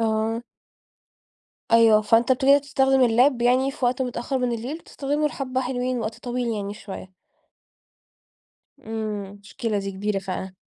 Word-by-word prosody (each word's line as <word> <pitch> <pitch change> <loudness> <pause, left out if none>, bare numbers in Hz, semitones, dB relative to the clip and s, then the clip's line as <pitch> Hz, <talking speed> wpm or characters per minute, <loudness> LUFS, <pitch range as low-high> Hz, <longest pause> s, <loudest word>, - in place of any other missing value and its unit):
آه. 225 +1 0 1.3
أيوه، 225 -2 +6
فأنت 230 +4 +3
بتقدر 275 +2 +5
تستخدم 270 -2 +2
اللاب 240 +2 +3
يعني 255 +3 +3
في 270 -2 -5
وقت 255 +2 +1
متأخر 250 +2 -2
من 250 -1 0
الليل، 250 +8 -4
بتستخدمه 295 0 -2
لحبة 260 -3 -2
حلوين 250 -1 -2
وقت 225 0 -4
طويل 245 0 -3
يعني 205 -2 -3
شوية. 190 -2 -9 1.7
امم، 215 -3 -4
مشكلة 210 +1 -3
دي 195 0 -4
كبيرة 200 +1 -2
فعلًا. 190 0 -5
235 Hz, 135 wpm, -24 LUFS, 215-260 Hz, 1.7 s, أيوه